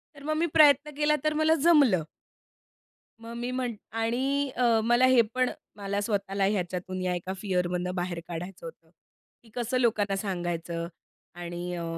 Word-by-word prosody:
तर 280 Hz, -, -13 dB
मग 310 Hz, +1 st, -1 dB
मी 335 Hz, -, +2 dB
प्रयत्न 300 Hz, -2 st, +5 dB
केला 300 Hz, 0 st, +3 dB
तर 305 Hz, -, +1 dB
मला 315 Hz, +1 st, +4 dB
जमलं. 280 Hz, -, +5 dB, 1.2 s
मग 230 Hz, 0 st, -9 dB
मी 240 Hz, +1 st, -3 dB
म्हंट 250 Hz, -3 st, -2 dB, 0.2 s
आणि 260 Hz, +5 st, 0 dB
अ, 235 Hz, -2 st, +3 dB
मला 240 Hz, +2 st, +4 dB
हे 255 Hz, -2 st, +6 dB
पण 255 Hz, 0 st, +1 dB, 0.3 s
मला 200 Hz, 0 st, -2 dB
स्वतःला 200 Hz, -2 st, -1 dB
ह्याच्यातून 185 Hz, -2 st, -2 dB
या 180 Hz, -1 st, 0 dB
एका 180 Hz, +2 st, -4 dB
फिअर 180 Hz, -3 st, 0 dB
मधनं 180 Hz, 0 st, -2 dB
बाहेर 175 Hz, -1 st, -3 dB
काढायचं 175 Hz, +1 st, -7 dB
होतं. 165 Hz, 0 st, -12 dB, 0.5 s
की 225 Hz, -, -20 dB
कसं 245 Hz, +1 st, -1 dB
लोकांना 210 Hz, -5 st, +1 dB
सांगायचं 175 Hz, -3 st, -3 dB, 0.5 s
आणि 175 Hz, 0 st, -5 dB
अ, 170 Hz, -, -4 dB
205 Hz, 160 wpm, -27 LUFS, 180-255 Hz, 1.2 s, हे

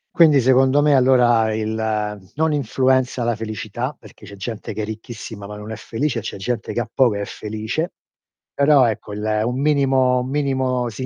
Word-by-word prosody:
Quindi, 155 Hz, -5 st, +6 dB
secondo 130 Hz, +3 st, +4 dB
me, 150 Hz, -1 st, +4 dB
allora 120 Hz, -4 st, +4 dB
il 110 Hz, 0 st, -2 dB, 0.6 s
non 160 Hz, 0 st, +1 dB
influenza 130 Hz, -2 st, +1 dB
la 120 Hz, -1 st, 0 dB
felicità, 110 Hz, +4 st, -5 dB
perché 105 Hz, -1 st, -15 dB
c'è 100 Hz, -, -10 dB
gente 105 Hz, +3 st, -6 dB
che 110 Hz, -, -4 dB
è -, -, -2 dB
ricchissima 110 Hz, -1 st, -8 dB
ma 105 Hz, 0 st, -8 dB
non 105 Hz, +1 st, -8 dB
è -, -, -4 dB
felice 120 Hz, +4 st, -2 dB
e -, -, -7 dB
c'è 105 Hz, -, -6 dB
gente 115 Hz, +3 st, -3 dB
che -, -, -2 dB
ha 115 Hz, -, -5 dB
poco 125 Hz, -6 st, +3 dB
e 100 Hz, -, -3 dB
è -, -, -3 dB
felice; 110 Hz, -, -4 dB, 0.6 s
però, 140 Hz, -2 st, +5 dB
ecco, 105 Hz, -2 st, -3 dB
il 105 Hz, +1 st, -1 dB
un 125 Hz, +2 st, -2 dB
minimo 135 Hz, -3 st, +3 dB
un 125 Hz, +1 st, -4 dB
minimo 130 Hz, -3 st, 0 dB
si 130 Hz, +3 st, -6 dB
125 Hz, 195 wpm, -21 LUFS, 110-135 Hz, 0.6 s, Quindi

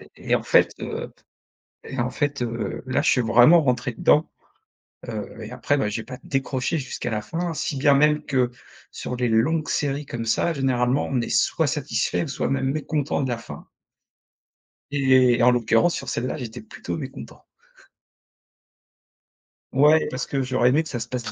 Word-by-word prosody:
Et -, -, 0 dB
en -, -, -2 dB
fait, -, -, +4 dB
heu, -, -, -5 dB, 0.7 s
et 135 Hz, -, -6 dB
en 120 Hz, +1 st, 0 dB
fait, 145 Hz, -1 st, -2 dB
heu, 115 Hz, -1 st, -3 dB
là 130 Hz, +2 st, +1 dB
je -, -, +2 dB
suis 125 Hz, -, +3 dB
vraiment 125 Hz, +9 st, +6 dB
rentré 125 Hz, -2 st, 0 dB
dedans. 150 Hz, +6 st, +3 dB, 0.8 s
Heu, -, -, -6 dB
et -, -, -8 dB
après, 145 Hz, -, 0 dB
bah, 105 Hz, -, 0 dB
j'ai 105 Hz, +2 st, -3 dB
pas 125 Hz, +3 st, -9 dB
décroché 135 Hz, +3 st, -1 dB
jusqu'à 130 Hz, -2 st, -5 dB
la 105 Hz, -1 st, -2 dB
fin. 165 Hz, +10 st, -3 dB
Si 145 Hz, -1 st, -3 dB
bien 140 Hz, +1 st, +4 dB
même 150 Hz, +2 st, +3 dB
que 130 Hz, -4 st, +1 dB, 0.4 s
sur 125 Hz, -, -5 dB
les 125 Hz, -1 st, 0 dB
longues 150 Hz, +8 st, +1 dB
séries 145 Hz, -1 st, -1 dB
comme 115 Hz, -1 st, -5 dB
ça 115 Hz, +9 st, +1 dB
généralement, 130 Hz, -1 st, +1 dB
on 130 Hz, -3 st, +1 dB
est -, -, -4 dB
soit -, -, +2 dB
satisfait -, -, -1 dB
ou -, -, -7 dB
soit -, -, -2 dB
même 135 Hz, -1 st, 0 dB
mécontent 150 Hz, -1 st, -2 dB
de 130 Hz, -, -1 dB
la 120 Hz, -, -2 dB
fin 115 Hz, -, -10 dB, 1.3 s
et 130 Hz, -3 st, +4 dB
en 125 Hz, -, +6 dB
l'occurrence 120 Hz, +6 st, +2 dB
sur -, -, -5 dB
celle-là, 125 Hz, +5 st, -2 dB
j'étais 120 Hz, -3 st, -7 dB
plutôt 220 Hz, -, -6 dB
mécontent. -, -, -9 dB, 2.3 s
Ouais, 150 Hz, +3 st, +5 dB
parce 130 Hz, +1 st, -4 dB
que 135 Hz, -1 st, -1 dB
j'aurais 130 Hz, -1 st, +2 dB
aimé 150 Hz, +5 st, +3 dB
que 155 Hz, -, -10 dB
ça 120 Hz, -, -4 dB
se 115 Hz, -, -5 dB
passe 120 Hz, -4 st, -4 dB
130 Hz, 175 wpm, -23 LUFS, 120-145 Hz, 2.3 s, vraiment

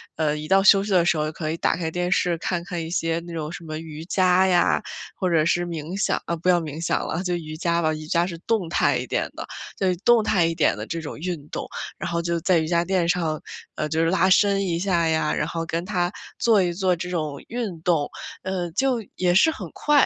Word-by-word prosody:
呃 155 Hz, -2 st, +1 dB
一 150 Hz, 0 st, -6 dB
到 195 Hz, +2 st, +4 dB
休 195 Hz, -1 st, +7 dB
息 205 Hz, -, -5 dB
的 180 Hz, -3 st, +4 dB
时 175 Hz, -, +3 dB
候 155 Hz, 0 st, -1 dB
可 155 Hz, -1 st, -4 dB
以 165 Hz, -, -3 dB
打 -, -, +1 dB
开 165 Hz, -2 st, -3 dB
电 180 Hz, +1 st, -1 dB
视 175 Hz, -1 st, +2 dB
看 175 Hz, 0 st, -2 dB
看 175 Hz, -3 st, -4 dB
一 160 Hz, -, -6 dB
些 165 Hz, -1 st, 0 dB
那 170 Hz, -, -7 dB
种 155 Hz, -2 st, -4 dB
什 175 Hz, -, -8 dB
么 155 Hz, -1 st, -5 dB
瑜 160 Hz, -1 st, -8 dB
伽 185 Hz, 0 st, +3 dB
呀， 175 Hz, -2 st, +3 dB, 0.3 s
或 185 Hz, -, -1 dB
者 160 Hz, -3 st, +3 dB
是 175 Hz, +1 st, +2 dB
冥 165 Hz, +1 st, -5 dB
想 -, -, +1 dB
啊 170 Hz, -, -1 dB
不 170 Hz, +2 st, -1 dB
要 175 Hz, -, +5 dB
冥 155 Hz, -1 st, -6 dB
想 -, -, 0 dB
了， 165 Hz, -, -2 dB
就 180 Hz, -2 st, 0 dB
瑜 155 Hz, -2 st, -6 dB
伽 170 Hz, 0 st, 0 dB
吧， 155 Hz, 0 st, +2 dB
瑜 155 Hz, 0 st, -7 dB
伽 170 Hz, +2 st, +2 dB
是 175 Hz, -1 st, -5 dB
动 195 Hz, -1 st, -1 dB
态 -, -, +2 dB
一 -, -, -3 dB
点 -, -, -1 dB
的， -, -, -6 dB, 0.3 s
就 185 Hz, -2 st, +2 dB
动 240 Hz, -2 st, +5 dB
态 185 Hz, -5 st, +3 dB
一 165 Hz, -, -2 dB
点 -, -, +3 dB
的 -, -, -6 dB
这 165 Hz, -, -3 dB
种 155 Hz, -, -6 dB
运 165 Hz, -3 st, -4 dB
动。 -, -, -4 dB, 0.3 s
然 -, -, -3 dB
后 170 Hz, 0 st, -1 dB
就 170 Hz, 0 st, -1 dB
在 180 Hz, +1 st, +3 dB
瑜 160 Hz, -1 st, 0 dB
伽 170 Hz, 0 st, +2 dB
垫 185 Hz, -1 st, +1 dB
上， 165 Hz, -3 st, 0 dB, 0.4 s
呃， 150 Hz, -, -2 dB
就 160 Hz, +2 st, 0 dB
是 165 Hz, -, +2 dB
拉 185 Hz, +1 st, +3 dB
伸 195 Hz, +1 st, +4 dB
一 170 Hz, -2 st, -1 dB
下 175 Hz, -3 st, +1 dB
呀， 160 Hz, -1 st, +1 dB
然 150 Hz, -, -1 dB
后 165 Hz, 0 st, -3 dB
跟 170 Hz, +1 st, -2 dB
他， 180 Hz, -2 st, 0 dB, 0.3 s
做 220 Hz, -4 st, +4 dB
一 175 Hz, -1 st, -1 dB
做 185 Hz, 0 st, +1 dB
这 180 Hz, +1 st, -5 dB
种 155 Hz, -5 st, -3 dB
运 220 Hz, -8 st, -4 dB
动， 165 Hz, -5 st, +1 dB, 0.3 s
嗯， 185 Hz, -2 st, -3 dB
就 255 Hz, 0 st, +1 dB
也 180 Hz, -1 st, +2 dB
是 210 Hz, -, +6 dB
很 -, -, -7 dB
快， 295 Hz, -2 st, +4 dB
170 Hz, 270 characters per minute, -24 LUFS, 160-185 Hz, 0.4 s, 休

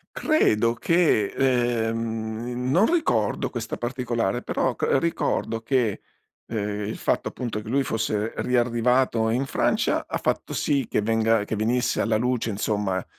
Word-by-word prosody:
Credo 115 Hz, -, +2 dB
che 165 Hz, -, +2 dB
ehm 115 Hz, -3 st, 0 dB, 0.5 s
non 195 Hz, -, +4 dB
ricordo 120 Hz, -, +1 dB
questa 120 Hz, -2 st, -5 dB
particolare, 120 Hz, -3 st, -2 dB
però 125 Hz, 0 st, -1 dB
cr -, -, +1 dB
ricordo 140 Hz, -8 st, -1 dB
che 115 Hz, -3 st, 0 dB, 0.5 s
ehm 105 Hz, -2 st, -3 dB
il 110 Hz, -, -4 dB
fatto -, -, 0 dB
appunto 115 Hz, -4 st, -4 dB
che 105 Hz, -, -9 dB
lui 135 Hz, +3 st, +2 dB
fosse 110 Hz, -2 st, -1 dB
riarrivato 120 Hz, -1 st, +2 dB
in 125 Hz, +4 st, 0 dB
Francia -, -, 0 dB
ha -, -, -2 dB
fatto -, -, -2 dB
sì 140 Hz, -4 st, 0 dB
che -, -, +1 dB
venga 115 Hz, 0 st, +2 dB
che 110 Hz, -, -3 dB
venisse 120 Hz, +3 st, 0 dB
alla 110 Hz, -1 st, +1 dB
luce 120 Hz, -1 st, 0 dB
insomma 100 Hz, -3 st, -1 dB
115 Hz, 140 wpm, -24 LUFS, 110-125 Hz, 0.5 s, non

